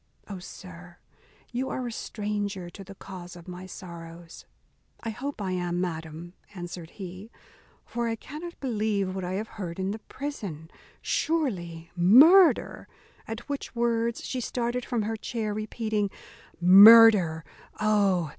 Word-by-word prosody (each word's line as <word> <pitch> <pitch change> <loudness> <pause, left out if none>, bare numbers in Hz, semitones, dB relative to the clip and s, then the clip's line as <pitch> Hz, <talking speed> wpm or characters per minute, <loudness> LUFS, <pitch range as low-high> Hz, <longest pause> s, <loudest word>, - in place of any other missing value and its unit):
O, 195 -3 -7
sir! 175 -1 -12 0.5
you 255 +2 -2
are 255 - -3
a 240 - -4
stranger 205 -5 -4
to 195 - -10
the 195 +1 -12
cause 180 -2 -10
of 175 0 -13
my 180 +1 -8
sorrows." 170 -2 -10 0.6
"I 225 - -3
hope 270 +5 -6
I 195 -2 -2
am, 175 -1 -2
madam," 165 -1 -5 0.2
answered 175 -2 -7
he; 190 +2 -8 0.6
"for 235 0 -3
I 225 - -1
cannot 310 +9 -9
believe 210 -6 -1
what 190 -1 -4
I 180 +1 -3
have 210 +3 -3
heard 170 -2 -5
in 190 +1 -1
the 220 - -5
prison 205 - -7 0.3
surely 175 - -2
murder" 285 - +6 0.4
at 225 +1 -7
which 285 -3 -5
words 235 -1 0
she 255 - -3
started 240 +1 -2
from 235 -4 -1
her 225 +2 -2
chair, 215 -1 -3
repeating, 215 -1 -2 0.5
"Murder! 195 -3 +8 0.3
oh! 200 -6 +2
200 Hz, 140 wpm, -27 LUFS, 175-230 Hz, 0.6 s, Murder